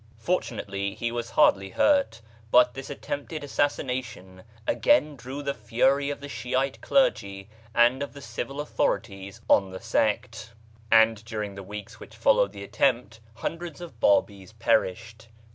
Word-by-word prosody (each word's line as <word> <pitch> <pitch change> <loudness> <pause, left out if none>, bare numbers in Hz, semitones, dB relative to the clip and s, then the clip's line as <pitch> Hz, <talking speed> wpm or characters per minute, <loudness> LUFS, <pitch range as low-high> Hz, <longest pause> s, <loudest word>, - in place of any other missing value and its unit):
Fortun 125 -2 -1
ately 100 -1 -4
he 120 0 -2
was 120 -1 -4
hardly 95 0 +3
hurt; 280 - +2 0.3
but 125 +1 +5
this 135 0 -8
attempted 145 +2 -5
assassination 125 -10 -2 0.2
again 155 - +3
drew 135 +3 -7
the 140 0 -1
fury 135 +6 +1
of 145 - -5
the 145 - -7
Shiite 135 0 -2
clergy 100 - +1 0.3
and 120 +3 +4
of 140 - -4
the 140 - -10
civil 140 0 -5
authorities 100 -9 -2
on 95 -2 +4
the 95 0 -8
sect, 110 0 -1 0.4
and 110 -1 +5
during 105 -3 -5
the 100 - -8
weeks 105 +1 -9
which - - -12
followed - - +3
the - - -9
attempt 120 -5 0 0.2
hundreds 165 +2 -5
of 165 -10 -10
Babis 100 -1 +1
perished. 110 0 -1
120 Hz, 145 wpm, -26 LUFS, 105-140 Hz, 0.4 s, but